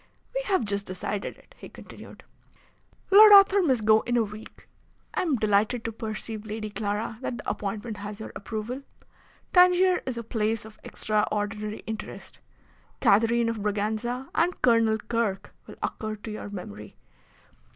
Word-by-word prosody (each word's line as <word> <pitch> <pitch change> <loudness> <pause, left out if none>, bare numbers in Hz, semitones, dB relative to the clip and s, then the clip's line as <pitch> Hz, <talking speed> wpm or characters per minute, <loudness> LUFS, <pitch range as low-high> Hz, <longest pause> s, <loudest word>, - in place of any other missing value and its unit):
"We - - -1
have 380 - +1
just 200 -1 -1
decided 185 +2 -4
it," - - -22
he - - -10
continued. - - -13 0.9
"Lord 420 +2 +9
Arthur 395 0 +8
must 260 - +1
go 215 0 +6
in 240 0 -1
a 235 - +3
week. 210 +1 -11 0.5
I - - 0
am 325 -6 +1
delighted 215 +2 +1
to 230 - -2
perceive, 220 0 -6
Lady 215 0 -5
Clara, 210 +2 -3
that 250 -2 -3
the - - -9
appointment 210 +2 -4
has 205 0 -7
your 220 - -7
approval. 220 +5 -5 0.7
Tangier 360 0 +5
is 255 -2 -3
a 235 - -4
place 220 -1 -1
of 220 0 -14
extraordinary 210 0 -2
interest. 220 -1 -8 0.6
Catherine 230 +3 +3
of 230 -2 -2
Braganza 215 +5 -2
and 345 +2 +1
Colonel 230 -2 +4
Kirke 220 -3 -2 0.2
will - - -10
occur 215 0 -3
to 215 +1 -8
your 210 -1 -6
memory. 105 - -9
220 Hz, 150 wpm, -26 LUFS, 210-240 Hz, 0.9 s, Lord